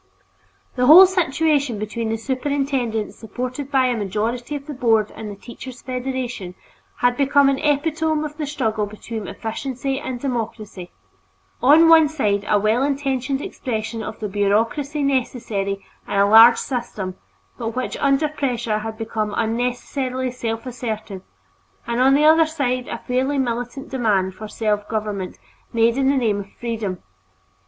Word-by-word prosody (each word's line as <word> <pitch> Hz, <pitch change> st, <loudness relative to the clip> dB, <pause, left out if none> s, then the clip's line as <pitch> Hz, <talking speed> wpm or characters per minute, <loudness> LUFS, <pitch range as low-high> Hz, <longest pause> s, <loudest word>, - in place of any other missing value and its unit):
The 250 Hz, 0 st, +2 dB
whole 345 Hz, +6 st, +11 dB
situation 305 Hz, -, +1 dB
between 220 Hz, +2 st, -3 dB
the 225 Hz, -, -1 dB
superintendent 260 Hz, -3 st, -1 dB
supported 255 Hz, +5 st, -5 dB
by 265 Hz, -2 st, +3 dB
a 250 Hz, -1 st, +1 dB
majority 225 Hz, +6 st, -2 dB
of 280 Hz, -1 st, -6 dB
the 300 Hz, -, -6 dB
Board 225 Hz, -5 st, +2 dB
and 220 Hz, -1 st, -7 dB
the 205 Hz, -, -7 dB
Teachers' 245 Hz, +4 st, -10 dB
Federation 250 Hz, -7 st, -4 dB, 0.5 s
had 245 Hz, 0 st, +3 dB
become 280 Hz, +1 st, +4 dB
an 270 Hz, -1 st, 0 dB
epitome 310 Hz, +1 st, 0 dB
of 300 Hz, 0 st, -7 dB
the 300 Hz, -2 st, -3 dB
struggle 220 Hz, -7 st, -1 dB
between 215 Hz, +1 st, -7 dB
efficiency 265 Hz, +4 st, -4 dB
and 255 Hz, -3 st, -5 dB
democracy; 220 Hz, -7 st, -4 dB, 0.7 s
on 305 Hz, +6 st, +7 dB
one 325 Hz, -2 st, +7 dB
side 210 Hz, -10 st, 0 dB
a 210 Hz, -, +4 dB
well 215 Hz, +4 st, +2 dB
intentioned 275 Hz, -1 st, -1 dB
expression 225 Hz, -2 st, -4 dB
of 220 Hz, -, -7 dB
the 215 Hz, -, -3 dB
bureaucracy 225 Hz, +9 st, 0 dB
necessary 225 Hz, -7 st, -1 dB, 0.2 s
in -, -, -5 dB
a 200 Hz, 0 st, +4 dB
large 225 Hz, +3 st, +8 dB
system 215 Hz, -8 st, -4 dB, 0.4 s
but 225 Hz, +1 st, -4 dB
which 255 Hz, -, -2 dB
under 280 Hz, +2 st, +2 dB
pressure 240 Hz, -7 st, -2 dB
had 220 Hz, 0 st, -6 dB
become 215 Hz, -2 st, -3 dB
unnecessarily 250 Hz, +3 st, -1 dB
self 230 Hz, -1 st, -4 dB
assertive, 220 Hz, -6 st, -5 dB, 0.6 s
and 235 Hz, +1 st, -1 dB
on 270 Hz, +1 st, +5 dB
the 300 Hz, +2 st, +4 dB
other 320 Hz, +1 st, +6 dB
side 255 Hz, -5 st, -2 dB
a -, -, -4 dB
fairly 260 Hz, +3 st, -1 dB
militant 245 Hz, +1 st, -3 dB
demand 205 Hz, -7 st, +1 dB
for 215 Hz, +3 st, -8 dB
self 210 Hz, -1 st, -2 dB
government 210 Hz, -4 st, -3 dB, 0.3 s
made 230 Hz, 0 st, +3 dB
in 270 Hz, 0 st, +2 dB
the 275 Hz, -, +2 dB
name 220 Hz, -5 st, +1 dB
of 200 Hz, 0 st, -8 dB
freedom. 220 Hz, -6 st, -4 dB
245 Hz, 150 wpm, -21 LUFS, 220-275 Hz, 0.7 s, whole